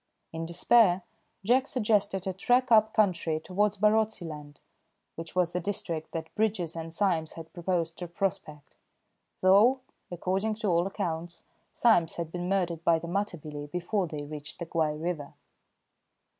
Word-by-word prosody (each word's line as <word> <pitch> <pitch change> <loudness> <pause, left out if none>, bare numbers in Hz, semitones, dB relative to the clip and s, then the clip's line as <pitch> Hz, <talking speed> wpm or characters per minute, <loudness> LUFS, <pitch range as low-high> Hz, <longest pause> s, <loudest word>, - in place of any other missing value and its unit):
In 165 0 -4
despair, 180 +1 +4 0.4
Jack 255 +5 +3
suggested 205 -6 +1
a 190 - -2
trek 245 +6 +2
up 220 -1 +6
country 170 -7 +1
towards 205 +5 0
Barotseland, 190 -9 0 0.6
which 165 +1 -9
was 180 -2 +2
the 180 - -1
district 170 -4 -3
that 160 -1 -6
Bridges 195 -7 -1
and 165 0 -6
Symes 165 -3 0
had 165 -1 -10
proposed 170 -2 -2
to 175 - -5
prospect, 170 -5 -4 0.7
though, 210 +8 +5 0.3
according 190 +5 -1
to 220 -1 -3
all 170 +1 +2
accounts, 170 -4 -4 0.3
Symes 175 -9 +3
had 170 -2 -4
been 175 +1 -4
murdered 175 -4 0
by 165 -1 +4
the 170 - -7
Matabele 160 -6 -4
before 180 +4 -1
they 150 -2 -6
reached 150 0 -8
the 170 - -5
Guai 155 -2 -1
river. 160 -4 -4
175 Hz, 145 wpm, -28 LUFS, 165-205 Hz, 0.7 s, up